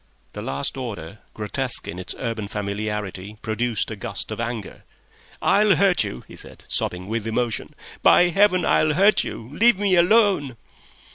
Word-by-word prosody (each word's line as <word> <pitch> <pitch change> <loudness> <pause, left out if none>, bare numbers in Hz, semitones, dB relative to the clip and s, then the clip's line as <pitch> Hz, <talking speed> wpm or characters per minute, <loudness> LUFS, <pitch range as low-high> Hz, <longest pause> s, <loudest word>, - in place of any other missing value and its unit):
The - - -6
last 70 - -3
order, 105 -7 -6 0.2
grotesque 120 +4 -1
in 90 - -6
its 90 - -5
urban 115 -4 -3
familiarity, 105 -1 -4
produced 110 0 -1
a - - -4
gust 100 - -6
of - - -5
anger. 115 -3 -5 0.6
"I'll 205 -1 +4
hurt 185 +2 +3
you," 60 - -6
he - - -12
said, - - -12
sobbing 90 +1 -3
with 110 0 -3
emotion. 115 0 -2 0.3
"By 175 - +6
Heaven, 185 0 +3
I'll 155 -1 +3
hurt 200 +3 +4
you! 115 - -7
Leave 220 +6 +4
me 200 -2 +2
alone!" 180 - +3
115 Hz, 155 wpm, -23 LUFS, -, 0.6 s, By